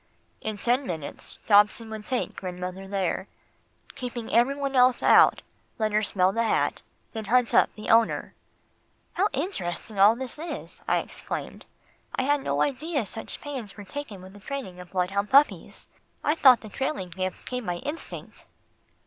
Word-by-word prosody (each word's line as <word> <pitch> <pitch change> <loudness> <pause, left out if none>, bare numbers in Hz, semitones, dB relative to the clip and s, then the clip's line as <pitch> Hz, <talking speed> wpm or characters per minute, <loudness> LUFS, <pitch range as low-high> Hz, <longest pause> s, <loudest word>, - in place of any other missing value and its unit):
In 215 -1 -3
ten 245 +5 +1
minutes, 160 -4 -5
Dobson 210 +2 +4
would 215 -1 -7
take 255 -2 -2
grandmother 185 +1 -5
there, 195 -1 -1 0.7
keeping 240 -2 -6
every 245 +4 +4
one 275 -1 -3
else 250 -1 +5
out, - - +6 0.3
let 215 -1 0
her 210 +1 +3
smell 190 -2 +2
the 230 - 0
hat, 230 - +1 0.3
then 220 -2 -5
hunt 245 +2 +2
up - - +5
the 215 - -3
owner." 225 0 +3 0.8
"How 385 +4 +2
interesting 215 - -3
all 205 +3 +7
this 260 +3 -6
is," 335 +2 -7
I - - +3
exclaimed. - - -5 0.5
"I - - 0
had 285 +1 +2
no - - +1
idea 290 -1 -1
such 220 +3 -4
pains 255 -9 -6
was 205 -2 -10
taken 230 -10 -7
with 190 +1 -12
the 205 - -13
training 200 -5 -6
of 180 -1 -10
bloodhound 195 +3 -1
puppies. 280 +2 +3 0.4
I 300 - +3
thought 260 -7 +6
the 215 - -9
trailing 265 -7 -3
gift 185 +1 -4
came 250 -3 -4
by 175 - 0
instinct." 290 - -7
225 Hz, 165 wpm, -26 LUFS, 195-265 Hz, 0.8 s, all